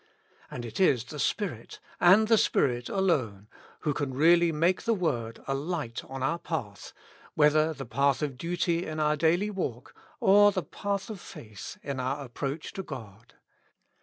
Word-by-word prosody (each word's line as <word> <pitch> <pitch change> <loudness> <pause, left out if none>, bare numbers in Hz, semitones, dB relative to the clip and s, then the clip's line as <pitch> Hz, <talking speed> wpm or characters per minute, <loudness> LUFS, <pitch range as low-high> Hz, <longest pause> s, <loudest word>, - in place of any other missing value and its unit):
And 120 - -6
it 110 - -7
is 135 -11 +4
the 150 +4 -9
Spirit, 165 - -2 0.2
and 195 +5 +6
the 225 -1 +5
Spirit 120 -2 +1
alone, 130 - 0 0.3
who 150 - 0
can 140 -2 -3
really 170 +4 +5
make 170 +4 +1
the 230 -1 +1
word 120 - -2
a 135 - 0
light 140 -4 -3
on 135 0 -6
our 165 +6 0
path, 105 - -5 0.4
whether 155 +1 +4
the 140 -3 -7
path 140 +5 +1
of 140 -3 -2
duty 170 +2 -1
in 155 0 -4
our 150 0 +2
daily 170 +7 +2
walk, 130 - -4 0.3
or 205 -3 +6
the 185 -2 -2
path 200 +6 -4
of 200 -5 -8
faith 105 -4 -10
in 140 -2 -4
our 135 +2 -2
approach 140 +5 -5
to 195 - -4
God. 115 - -10
150 Hz, 165 wpm, -28 LUFS, 125-175 Hz, 0.4 s, and